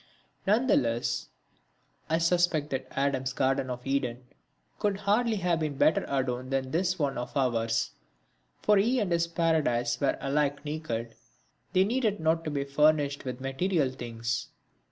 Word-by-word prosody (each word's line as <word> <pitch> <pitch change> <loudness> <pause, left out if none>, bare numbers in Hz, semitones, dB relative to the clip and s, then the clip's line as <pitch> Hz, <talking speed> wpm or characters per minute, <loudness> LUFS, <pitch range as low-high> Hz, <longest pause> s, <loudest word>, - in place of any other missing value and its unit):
None 220 +6 +3
the 255 - +4
less 115 -3 -1 0.8
I 160 - +3
suspect 165 -3 +2
that 130 -1 -3
Adam's 135 -1 -1
garden 135 -1 +1
of 125 0 -5
Eden 130 -3 -1 0.6
could 205 -2 +1
hardly 215 +3 +2
have 175 -4 +1
been 155 -3 -2
better 155 - +3
adorned 130 -2 -1
than 135 -1 -1
this 180 +2 +1
one 140 -6 -1
of 125 +4 -5
ours; 115 -3 +1 0.7
for 210 -1 +5
he 235 +6 +3
and 200 -5 -1
his 170 0 +2
paradise 150 -8 +1
were 140 - +2
alike 145 +1 0
naked; 120 -7 -4 0.6
they 185 0 +5
needed 220 -2 0
not 160 +1 +1
to - - -1
be 140 -2 -1
furnished 145 0 +2
with 125 0 -5
material 135 +2 0
things. 120 -2 -4
145 Hz, 155 wpm, -28 LUFS, 130-170 Hz, 0.8 s, for